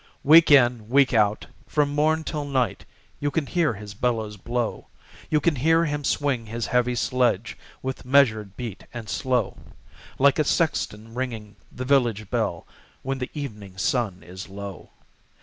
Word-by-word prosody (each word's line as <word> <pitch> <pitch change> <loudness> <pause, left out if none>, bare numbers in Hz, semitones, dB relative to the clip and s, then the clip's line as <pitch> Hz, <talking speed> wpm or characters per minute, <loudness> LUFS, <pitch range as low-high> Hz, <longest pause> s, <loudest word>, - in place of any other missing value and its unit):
Week 160 +3 +7
in, 120 -6 +4
week 135 0 +4
out, 105 -2 +2 0.2
from 145 -1 +1
morn 155 +2 +2
till 150 -1 -3
night, 130 -7 -1 0.3
You 145 - 0
can 155 0 -1
hear 160 -6 0
his 105 0 -9
bellows 110 -1 -1
blow; 120 +3 -3 0.4
You 155 - +3
can 150 0 +1
hear 165 +5 +3
him 145 -1 -2
swing 135 -5 0
his 115 +1 -3
heavy 125 -1 +1
sledge, 120 -3 0 0.3
With 130 0 -4
measured 110 -7 +2
beat 115 -6 -6
and 115 -2 -6
slow, 125 +1 -1 0.6
Like 140 +2 +4
a - - +4
sexton 115 -9 -1
ringing 115 -5 -5 0.2
the 130 - -6
village 120 -7 +1
bell, - - -1 0.4
When 135 0 -3
the 125 - -4
evening 105 -10 -7
sun 100 -2 -1
is 90 +2 -9
low. 100 -1 -8
125 Hz, 155 wpm, -24 LUFS, 110-140 Hz, 0.6 s, Week